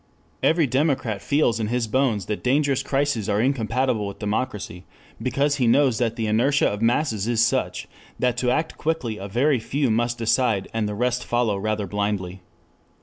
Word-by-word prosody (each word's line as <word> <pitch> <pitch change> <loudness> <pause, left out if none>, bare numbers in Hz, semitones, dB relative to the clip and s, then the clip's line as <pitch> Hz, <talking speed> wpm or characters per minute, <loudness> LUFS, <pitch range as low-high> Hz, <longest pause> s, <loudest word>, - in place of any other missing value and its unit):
Every 160 -1 +3
democrat 130 -6 0
feels 140 -6 +1
in 110 - -1
his 120 +1 0
bones 115 -5 +1
that 105 +1 -4
dangerous 140 +1 +2
crises 135 -7 -1
are 100 0 +1
incompatible 120 -2 0
with 100 - -7
democracy, 105 -4 -3 0.4
because 140 +3 0
he 125 -3 +2
knows 130 -1 +3
that 115 -2 0
the 115 -2 -2
inertia 120 +7 +2
of 105 +1 -3
masses 115 -3 +1
is 120 -1 +3
such - - -1 0.3
that 125 -2 +1
to 125 0 0
act 160 +5 -1
quickly 140 -9 -2
a 100 - -6
very 130 +6 +2
few 135 +2 -1
must 120 +2 0
decide 115 -3 +1
and 110 -2 -1
the 105 - -4
rest 125 +2 0
follow 120 -3 0
rather 105 +1 -2
blindly. 100 -2 -3
120 Hz, 175 wpm, -23 LUFS, 105-135 Hz, 0.4 s, Every